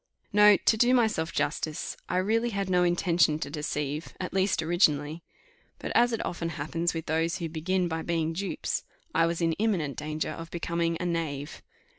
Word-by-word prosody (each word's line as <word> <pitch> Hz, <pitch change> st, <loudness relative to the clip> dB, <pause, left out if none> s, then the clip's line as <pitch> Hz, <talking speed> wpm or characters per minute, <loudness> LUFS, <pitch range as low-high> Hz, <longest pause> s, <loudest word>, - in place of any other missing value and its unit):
No, 210 Hz, -1 st, +7 dB
to 220 Hz, -, +2 dB
do 245 Hz, +3 st, +4 dB
myself 215 Hz, -9 st, +1 dB
justice, 155 Hz, -1 st, -2 dB
I 180 Hz, -, 0 dB
really 225 Hz, +5 st, +1 dB
had 195 Hz, -3 st, -2 dB
no 180 Hz, -1 st, +4 dB
intention 175 Hz, -3 st, +3 dB
to 145 Hz, -2 st, -5 dB
deceive, 150 Hz, 0 st, -3 dB
at 180 Hz, -, -4 dB
least 190 Hz, -3 st, +1 dB
originally; 160 Hz, -2 st, +2 dB, 0.6 s
but, -, -, -5 dB
as 240 Hz, +1 st, +4 dB
it 225 Hz, -, -2 dB
often 170 Hz, -1 st, -3 dB
happens 165 Hz, +2 st, -2 dB
with 160 Hz, -, -4 dB
those 165 Hz, +2 st, 0 dB
who 170 Hz, -, -3 dB
begin 175 Hz, +3 st, -1 dB
by 160 Hz, -1 st, -3 dB
being 165 Hz, -1 st, -1 dB
dupes, 195 Hz, +4 st, -2 dB, 0.3 s
I 165 Hz, -, +4 dB
was 170 Hz, +1 st, -2 dB
in 165 Hz, -1 st, +2 dB
imminent 180 Hz, -11 st, 0 dB
danger 155 Hz, +1 st, -3 dB
of 165 Hz, 0 st, -7 dB
becoming 170 Hz, -1 st, -1 dB
a 180 Hz, -, -2 dB
knave. 155 Hz, -4 st, -3 dB
170 Hz, 180 wpm, -28 LUFS, 160-185 Hz, 0.6 s, No